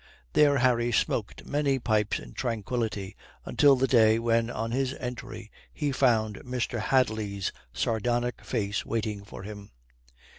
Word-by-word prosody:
There 145 -1 +5
Harry 120 -2 +2
smoked 110 -1 -1
many 145 -2 +1
pipes 110 -4 +1
in - - -10
tranquillity 110 -4 -3 0.3
until 145 -2 +5
the 130 +1 +2
day 110 -4 +5
when 115 0 +1
on 115 -1 -3
his 130 +2 0
entry 125 -3 -7 0.2
he 145 -2 -2
found 115 -6 +2
Mr. 125 -1 -3
Hadley's 110 -6 0 0.2
sardonic 120 - -1
face 105 -4 -2
waiting 105 -3 -3
for 100 -1 -10
him. 100 0 -9
115 Hz, 135 wpm, -28 LUFS, 105-125 Hz, 0.3 s, There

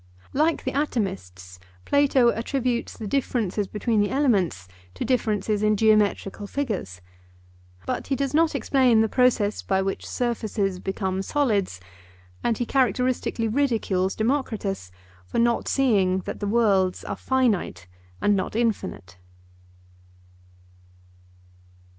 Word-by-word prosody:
Like 315 +4 +1
the 260 - -2
atomists, 185 - -3 0.3
Plato 275 -4 +4
attributes 240 +1 -2
the 220 - -6
differences 210 -4 -1
between 215 +1 0
the 205 - +1
elements 200 - +1 0.3
to - - -3
differences 215 -4 0
in 215 0 +2
geometrical 210 -1 +2
figures. 200 - -4 0.8
But - - -3
he 275 - 0
does 275 0 -2
not 320 +1 +3
explain 255 -5 +3
the 220 - +2
process 225 -4 +2
by 190 0 0
which 195 0 -3
surfaces 215 -6 -2
become 190 0 -2
solids; 205 - 0 0.6
and 230 -2 +1
he 240 - -1
characteristically 250 -2 0
ridicules 220 -7 0
Democritus 220 - -2 0.4
for - - -4
not 235 0 +2
seeing 195 -9 +2
that 205 - -6
the 205 - -3
worlds 200 -4 +2
are - - -3
finite 220 - 0 0.4
and 205 0 +4
not 190 +2 -2
infinite. 210 - -2
220 Hz, 115 wpm, -24 LUFS, 195-255 Hz, 0.8 s, Plato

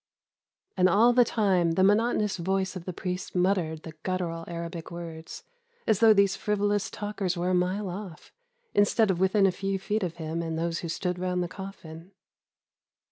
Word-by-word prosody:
"And 185 -1 +4
all 230 +6 +5
the 245 0 +6
time 190 -7 +2
the 185 - +2
monotonous 210 0 +2
voice 190 +2 -1
of 175 -2 -7
the 185 - -3
priest 180 +1 -5
muttered 180 -4 +1
the 160 - -7
guttural 170 -3 -3
Arabic 170 -1 -6
words, 165 -2 -8 0.4
as 215 -3 +2
though 225 -1 +7
these 200 -2 +4
frivolous 205 0 0
talkers 205 -3 -3
were 180 +2 0
a - - +1
mile 185 +3 0
off, 180 -3 -8 0.4
instead 205 +1 +3
of 175 - -2
within 190 +2 +3
a 195 - +4
few 195 +1 -2
feet 205 +3 -2
of 175 -3 -3
him 160 0 -4
and 165 -1 -3
those 165 0 -1
who 170 - -5
stood 180 +2 -2
round 180 0 -1
the - - -3
coffin. 185 -2 -10
185 Hz, 180 wpm, -27 LUFS, 170-200 Hz, 0.4 s, though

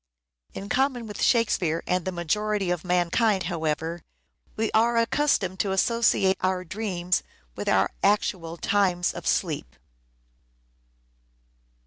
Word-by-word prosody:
In 200 - -6
common 260 0 0
with 210 -1 -7
Shakespeare 185 -9 +2
and 180 -1 0
the 185 - -1
majority 195 +3 -1
of 175 -3 -2
mankind, 180 +3 +1
however, 160 0 -2 0.5
we 220 0 -1
are 230 +2 +3
accustomed 230 -6 +1
to 190 +2 0
associate 195 -2 +2
our 185 0 0
dreams 180 -2 -1 0.3
with - - -3
our - - +3
actual 185 -4 0
times 185 -2 +1
of - - -7
sleep. - - -1
190 Hz, 115 wpm, -25 LUFS, 175-215 Hz, 0.5 s, are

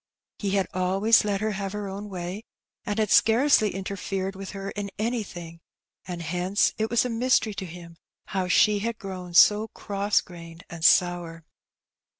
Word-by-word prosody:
He 200 -1 -1
had 195 -1 +2
always 195 +5 +3
let 205 -1 -1
her 215 0 0
have 195 -1 -4
her 210 -1 -4
own 200 +2 -7
way, 185 +2 -6 0.4
and 205 -1 -2
had 215 -2 0
scarcely 225 -3 +4
interfered 195 0 -4
with 195 0 -7
her 195 0 -6
in 205 -1 -5
anything, 205 -7 -4 0.5
and 175 -2 -5
hence 180 +5 0
it 220 +1 0
was 235 +1 +2
a - - +1
mystery 235 -2 +1
to 195 - -5
him 170 0 -11 0.3
how 190 -2 -1
she 210 +3 +4
had 230 +2 -3
grown 185 -3 -8
so 210 +4 +6
cross 200 -1 -1
grained 170 -1 -11
and 170 -1 -8
sour. 175 -2 +2
195 Hz, 165 wpm, -25 LUFS, 180-210 Hz, 0.5 s, so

